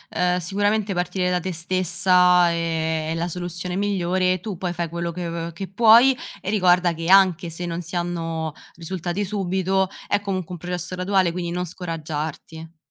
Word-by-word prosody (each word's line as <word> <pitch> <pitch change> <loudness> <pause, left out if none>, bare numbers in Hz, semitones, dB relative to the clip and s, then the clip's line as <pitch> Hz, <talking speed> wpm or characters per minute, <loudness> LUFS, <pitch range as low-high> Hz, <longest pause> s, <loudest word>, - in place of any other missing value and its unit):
uhm, 180 0 +2
sicuramente, 205 +3 0
partire 180 +1 -1
da 180 0 +1
te 185 - -3
stessa 180 0 +3
è 165 -1 -1
è - - 0
la 165 +1 -1
soluzione 175 +1 -5
migliore 185 -2 +1
e 185 - -3
tu 195 -1 -6
poi 180 -1 -3
fai 170 0 -2
quello 170 +1 -4
che 175 0 -5
v 165 0 -4
che 190 +4 -6
puoi 230 +6 +6 0.3
e 195 - -4
ricorda 180 -3 +3
che 165 +1 -5
anche 190 -3 +5
se 170 +2 -5
non 170 0 -3
si 170 +1 -8
hanno 165 -2 -3 0.2
risultati 175 +3 -3
subito, 190 -1 0 0.2
è 205 - +1
comunque 185 -3 -4
un 175 - -7
processo 180 +1 -4
graduale, 185 -1 +1
quindi 175 0 -4
non 180 +1 -2
scoraggiarti. 160 -1 -6
180 Hz, 175 wpm, -23 LUFS, 170-190 Hz, 0.3 s, puoi